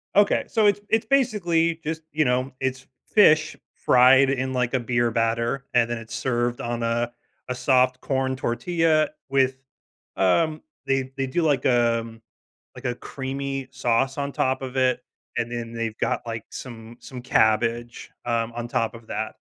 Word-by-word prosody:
Okay, 205 0 +4
so 220 -2 +2
it's 205 -1 +4
it's 225 0 +2
basically 175 -11 +1
just 160 +1 -3
you 155 0 +1
know, 130 +1 0
it's 130 0 -3 0.2
fish, 155 -7 +4 0.2
fried 130 +2 +5
in, 130 -1 -1
like, 125 -1 0
a 130 - +2
beer 120 0 +1
batter, 115 +4 0
and 120 -1 +3
then 120 - -2
it's 115 0 -8
served 120 -1 -1
on 120 0 -3
a 120 +1 0 0.4
a 125 - -3
soft 130 0 +2
corn 130 -1 -1
tortilla, 155 +5 +1 0.2
with, 130 -1 +2 0.6
um 155 - +2 0.3
they 135 -1 0
they 135 - -1
do 150 +7 0
like, 145 -5 +1
um 115 -2 +1 0.5
like, 125 - -12
a 125 -2 -1
creamy 135 +1 -5
sauce 130 0 0
on 140 0 -2
top 130 0 0
of 130 0 -6
it, 130 -1 +2 0.4
and 120 - -1
then 120 -1 -5
they've 115 -1 -3
got, - - 0
like, 115 -1 -5
some 115 -2 -9
some 125 -2 -9
cabbage, 120 0 +1 0.2
um, 115 -1 0
on 120 0 -5
top 115 0 -1
of 115 -1 -12
that. - - -4
130 Hz, 165 wpm, -24 LUFS, 120-135 Hz, 0.6 s, fried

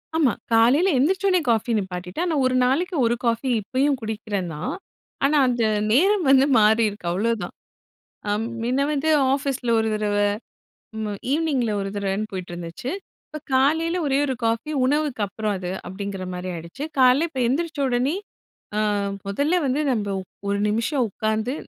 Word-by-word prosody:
ஆமா. 285 -8 +3 0.2
காலைல 260 +12 +5
எந்திரிச்ச 370 +9 +1
உடனே 365 -2 +3
காஃபி 225 +1 0
நிப்பாட்டிட்டேன். 185 - -3
ஆனா, 330 - 0
ஒரு 255 - +1
நாளைக்கு 340 +8 0
1 235 +1 +2
காபி 235 +3 0
இப்பயும் 270 +6 0
குடிக்கிறன்தான். 205 -7 -4 0.5
ஆனா, 295 +2 +3
அந்த 240 -2 +1 0.3
நேரம் 370 - +3
வந்து 270 0 +6
மாறி 220 +2 +4
இருக்கு 200 -4 -8
அவ்ளோதான். 220 +4 -1 0.8
அ, - - +1 0.3
மின்ன 250 +3 0
வந்து 295 +2 -1 0.2
ஆபிஸ்ல 270 -3 -1
1 220 - +1
தடவ, 210 -1 -1 0.8
ம், 210 -2 -3
ஈவினிங்ல 285 -7 +1
1 195 - -3
தடவனு 200 +1 -2
போயிட்டு 185 -2 -6
இருந்துச்சு. 175 +9 -6 0.4
இப்ப 305 - -7
காலைல 320 +6 +2
ஒரே 275 0 +2
1 265 - -1
காபி 230 +7 -1
உணவுக்கு 290 -3 0
அப்புறம் 215 +1 -2
அது 180 -1 -5 0.2
அப்படிங்குற 195 0 -5
மாரி 180 +1 -5
ஆயிடுச்சு. 170 - -7 0.2
காலைல 260 +5 +5
இப்ப 260 - -2
எந்திரிச்ச 315 +2 -2
உடனே 255 +7 +1 0.6
ஆ, 215 - +2 0.5
முதல்ல 285 - +1
வந்து 275 +1 0
நம்ப 215 -5 0 0.4
ஒரு 200 0 +1
நிமிஷம் 235 +5 0
உக்காந்து 220 +4 -2
240 Hz, 150 wpm, -23 LUFS, 205-285 Hz, 0.8 s, வந்து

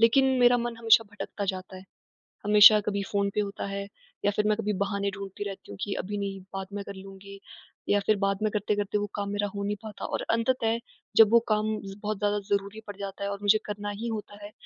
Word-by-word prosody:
लेकिन 230 +4 +5
मेरा 245 0 +6
मन 235 0 -3
हमेशा 225 0 +5
भटकता 205 0 -5
जाता 185 0 -8
है। 185 - -11 0.6
हमेशा 210 +1 +9
कभी 200 -1 -2
फ़ोन 200 -1 +1
पे - - +2
होता 200 -1 -4
है, 200 0 -4 0.4
या 205 - +4
फिर 210 - +1
मैं 215 0 +2
कभी 210 -1 -1
बहाने 200 0 -1
ढूँढती 200 0 -6
रहती 195 - -8
हूँ 100 - -8
कि 205 - -2
अभी 205 +2 -5
नहीं, 195 -1 -3
बाद 195 -1 -4
में 200 0 -4
कर 200 - -8
लूँगी 195 +1 -11 0.5
या 205 - +4
फिर 215 - +4
बाद 195 0 +1
में 215 - +1
करते-करते 205 0 0
वो 205 0 -1
काम 200 -1 -2
मेरा 205 0 -1
हो 200 - -3
नहीं 205 +1 -1
पाता 210 -2 -7
और - - -2
अंततः 230 0 +1 0.4
जब 220 -1 +8
वो 235 - +7
काम 215 -1 +2 0.2
ज़ 195 0 -7
बहुत 210 -1 -2
ज़्यादा 205 +1 +1
ज़रूरी 200 +1 -1
पड़ 205 - -7
जाता 200 0 -6
है, 200 - -1
और 200 0 -4
मुझे 205 +1 +5
करना 205 0 -4
ही 205 +3 -4
होता 210 -2 -5
है, 205 - -8
205 Hz, 235 wpm, -27 LUFS, 200-215 Hz, 0.6 s, हमेशा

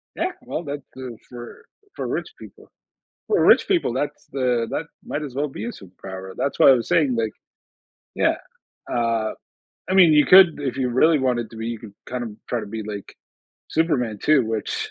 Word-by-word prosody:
Yeah, 365 +2 -1
well, 245 -9 -5
that 145 -2 -5
goes 125 -4 -7
for 120 -1 -10 0.3
for - - -4
rich - - -2
people. - - -14 0.6
For 425 - +3
rich - - +6
people, 355 - +2
that's 145 +3 -3
the 125 -3 +1
that 160 - -2 0.2
might 150 - -4
as 140 -4 -6
well 145 +2 -1
be 110 -5 -7
a - - -3
superpower. 95 0 -9
That's 140 - -2
why - - +7
I - - +9
was 120 -3 0
saying, 160 -7 +3
like 115 -1 0 0.9
Yeah. - - +2 0.6
Uh, 115 -2 0 0.6
I - - +1
mean, 180 -5 +7
you 150 -1 +5
could 185 -5 +7
if 135 -2 -3
you 125 -2 0
really 155 +6 +4
wanted 125 -4 0
to 115 - -12
be, 115 - -5
you 115 -2 -4
could 105 -3 -12
kind 125 0 -4
of 115 - -6 0.2
try 120 - -1
to 105 - -7
be 110 +2 -5
like 105 -2 -8 0.5
Superman, 130 -10 0
too, 150 -5 +4
which 110 -1 -3
125 Hz, 195 wpm, -23 LUFS, 115-150 Hz, 0.9 s, I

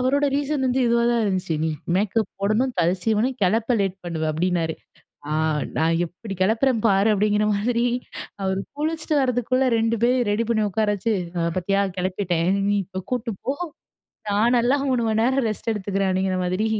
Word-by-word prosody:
அவரோட 280 +3 +2
ரீசன் 285 -1 0
வந்து 255 +1 +1
இதுவா 235 0 +3
தான் 235 -1 +2
இருந்துச்சு. 185 -4 -1
நீ 160 - +1 0.3
மேக்கப் 210 +3 +1
போடணும் 220 +5 +1
தல 170 - +3
சீவனும் 225 +4 +1
கிளப்ப 225 +6 +2
லேட் 195 -1 -1
பண்ணுவ 165 -2 -3
அப்டின்னாரு. 165 0 0 0.5
ஆ - - -4 0.5
நான் 165 +1 +2
எப்டி 195 +4 -8
கெளப்பறன்னு 225 +3 +2
பாரு 195 +2 +3
அப்டிங்கிற 210 +1 +2
மாதிரி 235 +3 0 0.6
அவர் 190 0 0 0.2
குளிச்சிட்டு 310 +1 -2
வரதுக்குள்ளே 255 0 +1
2 225 +1 +1
பேரயு 250 +1 +3
ரெடி 215 +3 +1
பண்ணி 220 -2 +2
உட்கார 215 +2 0
வெச்சு 215 +3 -1 0.4
பாத்தியா 195 +2 +1 0.2
கெளப்பிட்டேன். 180 -2 -1 0.2
"நீ 205 - +2
இப்போ 190 +1 -6
கூட்டிட்டு 240 -3 -2
போ 270 - +2 0.8
நான் 220 +4 +3
நல்லா 245 +4 +3
3 250 -2 +1
மணி 220 0 +1
நேரம் 260 +1 +2
ரெஸ்ட் 215 +1 -3
எடுத்துக்கிறேன்" 195 -1 -1
அப்படிங்கிற 185 0 0
மாதிரி 185 +5 0
215 Hz, 165 wpm, -23 LUFS, 190-245 Hz, 0.8 s, இதுவா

